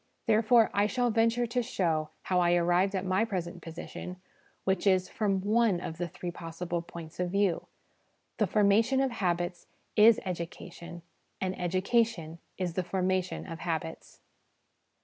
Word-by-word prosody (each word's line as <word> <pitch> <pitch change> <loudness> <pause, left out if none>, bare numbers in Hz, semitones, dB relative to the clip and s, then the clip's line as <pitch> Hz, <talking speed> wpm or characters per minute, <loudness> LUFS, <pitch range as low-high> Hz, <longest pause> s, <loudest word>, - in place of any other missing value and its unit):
Therefore, 225 +1 +4
I 205 +1 +3
shall 245 +1 +1
venture 230 +2 +2
to 240 +2 0
show 165 -10 -1
how 180 -1 +1
I 175 0 +4
arrived 175 +3 +2
at 190 0 -2
my 185 +3 +2
present 180 -5 -4
position, 175 +2 -8 0.4
which 190 +1 0
is, 185 -1 +3
from 200 -6 0
one 215 -2 +2
of 160 -1 -6
the 175 - -1
three 175 +1 -6
possible 170 0 -4
points 170 -1 -10
of 180 0 0
view 195 -2 +1 0.7
The 215 - +2
formation 215 +6 +3
of 270 -1 +1
habits 175 -4 -2 0.3
is 220 +1 +7
education, 170 -1 -6 0.4
and 185 0 -1
Education 185 -2 0 0.2
is 180 -3 -2
the 185 - -1
formation 185 0 -1
of 165 -1 -7
habits. 160 -1 -5
185 Hz, 150 wpm, -29 LUFS, 175-215 Hz, 0.7 s, is